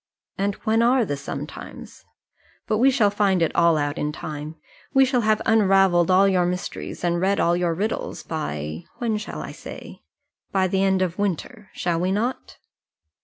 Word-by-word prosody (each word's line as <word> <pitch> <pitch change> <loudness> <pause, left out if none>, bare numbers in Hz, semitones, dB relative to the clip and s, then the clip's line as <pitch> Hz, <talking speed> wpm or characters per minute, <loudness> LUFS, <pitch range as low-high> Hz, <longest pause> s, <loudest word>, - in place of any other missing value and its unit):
"And 200 0 -1
when 225 +1 +2
are 245 0 +3
the 145 - -2
sometimes? 140 - -8 0.6
But 215 - 0
we 260 +3 +6
shall 230 -6 +3
find 200 -2 +2
it 165 - -1
all 170 -2 +4
out 145 +1 -2
in 150 - -1
time. 150 0 -7 0.4
We 270 0 +7
shall 255 -2 +1
have 215 -1 +1
unravelled 195 -5 +4
all 190 +2 +5
your 180 -2 +2
mysteries, 180 0 -5
and 175 0 +1
read 195 +2 +2
all 170 +1 +3
your 175 -2 0
riddles, 210 +6 -3
by 75 - -4
when 225 -3 -1
shall 210 0 -6
I - - -7
say? - - -10 0.5
by 190 -1 +2
the 190 +1 0
end 190 -1 +2
of 180 -1 -3
the - - -2
winter. 205 - -3
Shall 170 -2 -1
we 180 +2 0
not?" 230 +6 -2
190 Hz, 180 wpm, -23 LUFS, 170-215 Hz, 0.6 s, We